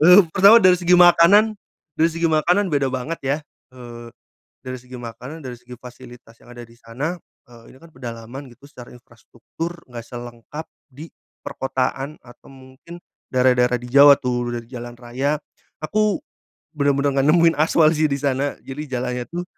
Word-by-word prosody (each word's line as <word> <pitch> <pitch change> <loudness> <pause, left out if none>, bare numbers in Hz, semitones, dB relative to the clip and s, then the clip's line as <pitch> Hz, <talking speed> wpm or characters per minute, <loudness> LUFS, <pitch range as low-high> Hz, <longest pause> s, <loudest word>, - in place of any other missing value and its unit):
Eee, 180 +5 +8
pertama 200 +4 +7
dari 185 -3 +5
segi 175 0 0
makanan, 180 +5 +5 0.4
dari 160 - +3
segi 165 0 -1
makanan 175 +6 +1
beda 140 -2 +1
banget 130 +6 -4
ya, 140 +2 0 0.3
eee, 120 -2 -11 0.6
dari 130 0 -6
segi 125 +1 -13
makanan, 125 +6 -9
dari 125 -2 -7
segi 125 0 -12
fasilitas 120 -2 -14
yang - - -17
ada 120 0 -10
di 115 - -20
sana. 130 +9 -5 0.3
Eee, 120 -1 -17
ini - - -18
kan 165 +2 -17
pedalaman 120 +1 -9
gitu 130 +4 -18
secara 125 -4 -13
infrastruktur 120 +7 -9 0.2
nggak 120 -2 -9
selengkap 120 +5 -9 0.2
di 145 +3 -12 0.4
perkotaan 135 +1 -3
atau 120 -1 -18
mungkin 135 +6 -14 0.3
daerah-daerah 125 -1 +2
di 125 - -10
Jawa 140 +1 +8
tuh, 120 -1 -2
dari 115 -1 -7
jalan 120 -1 -9
raya, 130 +5 -2 0.4
aku 210 +4 0 0.5
benar-benar 140 -1 0
nggak 135 - +1
nemuin 165 -1 +4
aspal 155 0 +4
sih 155 +1 +2
di 140 - -1
sana. 140 0 -1
Jadi 150 +3 -7
jalannya 125 -1 -3
tuh 175 +1 -5
135 Hz, 160 wpm, -21 LUFS, 120-160 Hz, 0.6 s, Eee